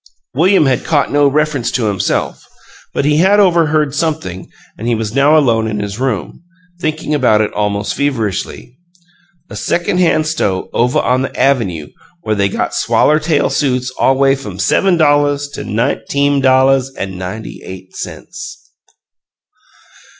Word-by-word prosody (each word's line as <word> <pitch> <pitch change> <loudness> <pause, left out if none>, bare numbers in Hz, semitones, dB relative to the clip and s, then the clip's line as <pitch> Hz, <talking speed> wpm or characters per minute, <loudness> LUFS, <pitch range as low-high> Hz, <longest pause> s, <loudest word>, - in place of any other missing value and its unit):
William 175 +4 +3
had 130 -3 +1
caught 145 -3 0
no 145 0 +4
reference 145 -3 0
to 120 - -1
himself, 100 -3 -1 0.5
but - - -1
he 150 0 +2
had 195 +5 +4
overheard 155 -6 +2
something 150 - -3 0.3
and 115 - -6
he 120 - +2
was 110 -1 -4
now 140 +4 +4
alone 115 -7 +2
in 105 -1 -3
his 100 +2 -5
room, 125 - -3 0.4
thinking 155 -2 -2
about 125 -7 +3
it 110 - -1
almost 105 0 -1
feverishly. 125 -1 -3 0.7
"A - - -7
secon' 175 +1 -1
han' 165 -3 +3
sto' 105 - -2
ovuh 125 +1 +1
on 125 +2 +1
the 135 - -2
avynoo, 100 - 0 0.3
where 110 - -1
they 100 -1 +1
got - - -2
swaller 155 +1 +2
tail 155 -1 0
suits 130 -3 0
all 130 +1 +1
way 135 0 +4
f'um 105 -9 -7
sevum 180 - +2
dolluhs 145 -2 +2
to - - -6
nineteem 140 +5 0
dolluhs 130 0 +3
an' 95 -2 -5
ninety 95 +5 -7
eight 95 0 -11
cents." - - -9
135 Hz, 150 wpm, -15 LUFS, 110-150 Hz, 0.7 s, no